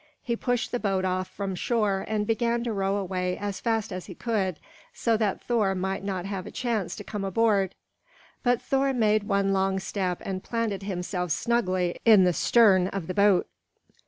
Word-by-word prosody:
He 235 - -1
pushed 245 -1 -1
the 245 - -1
boat 195 -3 0
off 185 0 -1
from 195 +1 -4
shore 205 -1 0
and 215 -1 -1
began 235 +1 0
to 235 -2 -2
row 195 -1 0
away 185 -2 -2
as 205 -1 -4
fast 225 -3 -1
as 185 -1 -6
he 185 - -9
could, 195 -7 -1 0.4
so 230 - +1
that 215 -3 -1
Thor 215 -5 +1
might 190 +1 -2
not 190 -2 -3
have 195 -2 -4
a - - -6
chance 230 -6 -2
to 205 - -8
come 205 -1 -5
aboard. 195 -1 +1 0.7
But 245 -2 +2
Thor 270 0 +1
made 215 -3 +2
one 200 -1 +1
long 190 0 +1
step 190 -2 -2
and 185 -1 -4
planted 230 -4 -2
himself 180 -2 -3
snugly 185 -1 0
in 215 -4 +7
the 180 -1 +3
stern 195 -3 +4
of 195 -3 -4
the 185 - -4
boat. 200 -2 +4
200 Hz, 190 wpm, -26 LUFS, 185-225 Hz, 0.7 s, in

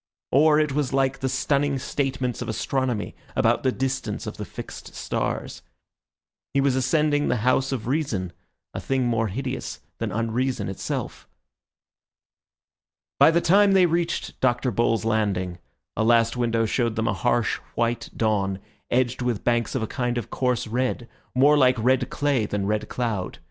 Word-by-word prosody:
Or 150 +2 +5
it 150 -2 +1
was 140 -2 -1
like 135 -1 +1
the 135 0 -1
stunning 140 +1 +1
statements 130 -2 -2
of - - -4
astronomy 125 -1 -1 0.2
about 120 -2 +3
the 130 - +2
distance 135 +1 -3
of - - -6
the - - -5
fixed - - -9
stars. - - -3 0.9
He - - +4
was 135 -1 +2
ascending 145 +2 +2
the - - +2
house 130 +1 +2
of 130 -5 -3
reason, 120 - -1 0.4
a - - -4
thing 135 -1 0
more 115 -2 +1
hideous 130 +6 -4 0.2
than - - -2
unreason 115 -1 -1
itself. 95 - -5 1.9
By - - +8
the 170 +1 +3
time 200 +3 +5
they 190 -2 +6
reached 170 0 -1
Dr. 125 0 +1
Bull's 115 0 +1
landing, 100 -5 0 0.4
a 110 - +1
last 115 0 +4
window 115 -2 +1
showed 115 0 0
them 110 0 0
a - - +1
harsh, 120 -2 +1 0.2
white 115 0 -1
dawn 100 -4 +1 0.3
edged 125 0 +1
with 120 -4 -1
banks 120 -1 +1
of 125 - 0
a - - +1
kind 125 0 -2
of 120 - -4
coarse 125 -2 0
red, 120 +1 -2 0.3
more 145 +4 +6
like 130 -1 +4
red 125 +2 +2
clay 140 -7 0
than 100 -1 -2
red 105 +1 -1
cloud. 110 -7 -2
125 Hz, 160 wpm, -24 LUFS, 115-135 Hz, 1.9 s, By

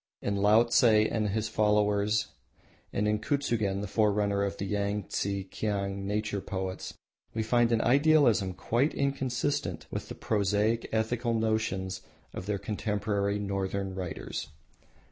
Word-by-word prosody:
In 100 - -2
Laotse 110 +5 +4 0.3
and 110 -2 0
his 110 +2 -1
followers 105 0 +2 0.6
and 105 +1 0
in 105 0 +1
Kutsugen, 110 -8 0
the 105 - -4
forerunner 100 -1 +1
of 100 0 -1
the 100 - -3
Yangtse 100 -1 -2
Kiang 100 -2 -2
nature 105 -1 -1
poets, 95 -1 -5 0.4
we 110 - 0
find 120 +1 +3
an 115 -1 +3
idealism 130 - +4
quite 120 +10 0
inconsistent 135 - -1
with - - -5
the - - -6
prosaic 105 +2 0
ethical 115 +2 0
notions 105 -4 -1 0.3
of 95 - -6
their 105 -1 0
contemporary 100 0 -1
northern 100 -1 -2
writers. 90 -5 -5
105 Hz, 125 wpm, -29 LUFS, 100-110 Hz, 0.6 s, Laotse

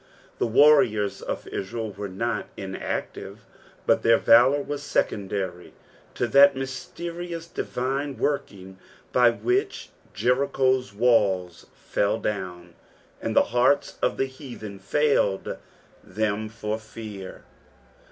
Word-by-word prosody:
The - - +1
warriors 115 -5 +4
of - - -5
Israel 110 +2 -4
were 100 +1 -6
not 115 +5 -2
inactive, 95 -1 -5 0.4
hut - - +3
their 115 0 +5
valour 130 +5 +5
was 145 0 -5
secondary 95 -8 -2 0.4
to - - 0
that 140 +3 +6
mysterious, 170 +6 -6
divine 135 -2 -3
working 95 -9 -3 0.3
by 125 -1 +6
which 370 - -1 0.3
Jericho'* 130 0 +2 0.2
walia 95 -7 +2
fell 100 - -1
down, 90 -4 -5 0.5
and - - -3
the - - +4
heartB 130 +4 +2
of - - +1
the 135 - +1
heathen 125 -7 -9
failed 100 -2 +1 0.5
them 110 +1 -2
for 110 -1 -4
fear. 110 -3 -9
115 Hz, 110 wpm, -25 LUFS, 100-135 Hz, 0.5 s, that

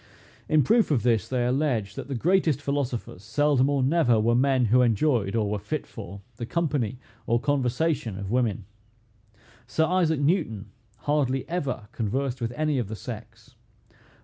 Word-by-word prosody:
In 155 -2 +4
proof 225 - +3
of 140 -7 +1
this 115 -5 +2
they 125 -2 0
allege, 125 -6 0
that - - -7
the 140 - -3
greatest 165 +1 +2
philosophers 140 -9 -3
seldom 145 +2 +2
or 140 -2 +1
never 130 -5 +3
were 115 +2 +2
men 130 0 +3
who 120 +4 +4
enjoyed, 115 -3 +2
or 110 -2 +1
were 105 0 -2
fit 150 +10 -4
for, 100 -3 -9 0.2
the 120 - -4
company 145 -9 -1 0.3
or 120 0 +2
conversation 135 - 0
of 100 0 -5
women. 115 -5 0 1.0
Sir 140 +9 +1
Isaac 165 -3 +1
Newton 145 - 0 0.3
hardly 135 -3 0
ever 140 -10 -3
conversed 125 +4 -2
with 115 0 -1
any 155 -3 +1
of 120 - -2
the 110 - -5
sex. 110 -1 -9
125 Hz, 160 wpm, -26 LUFS, 115-145 Hz, 1.0 s, In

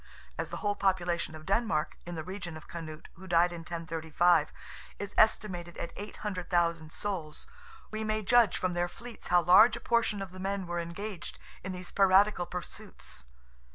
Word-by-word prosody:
As - - -3
the - - -5
whole 205 -1 0
population 175 -5 0
of 155 0 -10
Denmark, 195 -5 0
in 175 - -5
the 160 - -4
reign 180 -2 -6
of 155 - -13
Canute 160 -2 -8
who 190 +2 -11
died 175 0 +4
in 170 - -6
1035, 165 -1 +1 0.5
is 205 0 -6
estimated 185 -6 +2
at 170 - -5
800,000 175 -6 -2
souls, 170 -7 -4 0.5
we 215 0 -3
may 215 0 -1
judge 230 -1 +4
from 185 -1 -1
their 175 0 0
fleets 235 +6 -10
how 175 0 +4
large 195 +7 +7
a - - -6
portion 230 -3 +1
of 195 -2 -6
the 185 - -10
men 195 0 -2
were 175 0 -2
engaged 175 +2 -6 0.3
in 185 - -4
these 180 -1 -6
piratical 195 -1 +4
pursuits. 175 - -8
180 Hz, 170 wpm, -30 LUFS, 170-205 Hz, 0.5 s, large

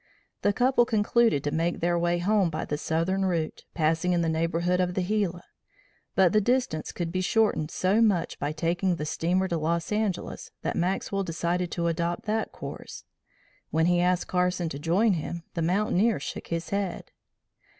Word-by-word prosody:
The 205 - +3
couple 245 +2 +3
concluded 220 - +2
to 145 - -1
make 165 +3 0
their 175 +1 +1
way 175 0 +1
home 195 +1 +2
by 155 0 -3
the 150 - -2
southern 165 +6 0
route, 170 -4 -2
passing 165 +2 +1
in 170 -1 +2
the 165 - +1
neighborhood 165 +2 0
of 180 0 -1
the 185 - +1
Gila; 185 -3 -1 0.7
but 185 -2 +4
the 215 - +4
distance 240 -9 0
could 170 -2 -4
be 185 +1 -1
shortened 185 -6 +1
so 190 +6 +2
much 200 -7 +1
by 145 +1 -1
taking 175 +4 0
the 150 - -4
steamer 180 +5 0
to 170 -3 -1
Los 165 +3 -1
Angeles 210 -4 -2
that - - -1
Maxwell 195 +2 -1
decided 175 +1 -1
to 170 - -1
adopt 170 +1 -1
that 220 +1 -1
course. - - -8 0.7
When 160 +1 +2
he 175 0 +3
asked 180 0 +2
Carson 180 -2 0
to 140 - -6
join 190 +8 +2
him 170 0 -4
the 170 - -2
mountaineer 200 +4 +2
shook - - -6
his 165 0 -3
head. 200 -2 -3
175 Hz, 180 wpm, -27 LUFS, 165-195 Hz, 0.7 s, but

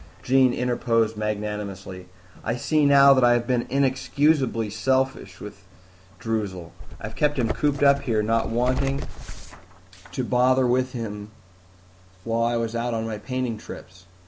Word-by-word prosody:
Jean 130 0 +4
interposed 120 -2 0
magnanimously, 105 -3 -5 0.4
"I 115 - -1
see 150 +4 +1
now 140 0 +7
that 130 -2 +2
I 120 0 +6
have 120 0 0
been 120 -1 -1
inexcusably 135 -3 +1
selfish 130 -3 -1
with 105 -1 -10 0.6
Droozle. 105 -7 -4 0.3
I've - - -8
kept 150 -1 +1
him 120 -3 0
cooped 140 +6 0
up 140 0 +5
here, 110 -3 0
not 115 +1 0
wanting 130 +4 0 1.1
to 130 - -3
bother 130 +1 +2
with 130 +1 +1
him 105 -4 -6 0.9
while 115 +1 -1
I 120 0 +1
was 115 0 -3
out 120 0 -2
on 110 0 -2
my 110 -2 -5
painting 125 -1 -3
trips. 90 -3 -12
120 Hz, 145 wpm, -24 LUFS, 110-130 Hz, 1.1 s, now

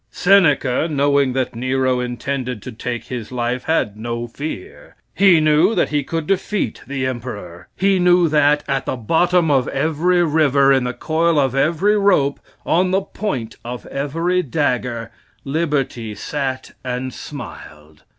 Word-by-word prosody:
Seneca, 160 -7 +3
knowing 140 -2 +2
that 130 -2 -2
Nero 130 +1 0
intended 125 -1 -4
to 130 - -7
take 120 +1 -5
his 125 -3 -6
life, 125 0 -2
had 130 -10 0
no 120 +2 -4
fear. 385 - -8 0.2
He 190 -4 +5
knew 155 +7 +3
that - - +1
he 145 -1 0
could 165 +2 -3
defeat 195 +3 -1
the 135 -1 -2
Emperor. 110 -9 -6
He 195 0 +2
knew 180 -1 +4
that 150 -1 +3
"at 135 -1 -1
the - - -1
bottom 165 +7 +2
of 135 -3 +2
every 165 +5 +1
river, 145 -4 +3
in 130 -2 +2
the 125 - -2
coil 165 +1 +1
of 135 -3 +2
every 170 +9 +2
rope, 165 -9 +2 0.3
on 180 +3 +2
the 190 +1 +2
point 135 - -4
of 120 +1 -7
every 165 +6 -1
dagger, 125 -6 -2 0.3
Liberty 135 -7 -2
sat 130 +2 -4
and 125 0 -4
smiled." 75 - -10
140 Hz, 150 wpm, -19 LUFS, 125-165 Hz, 0.3 s, He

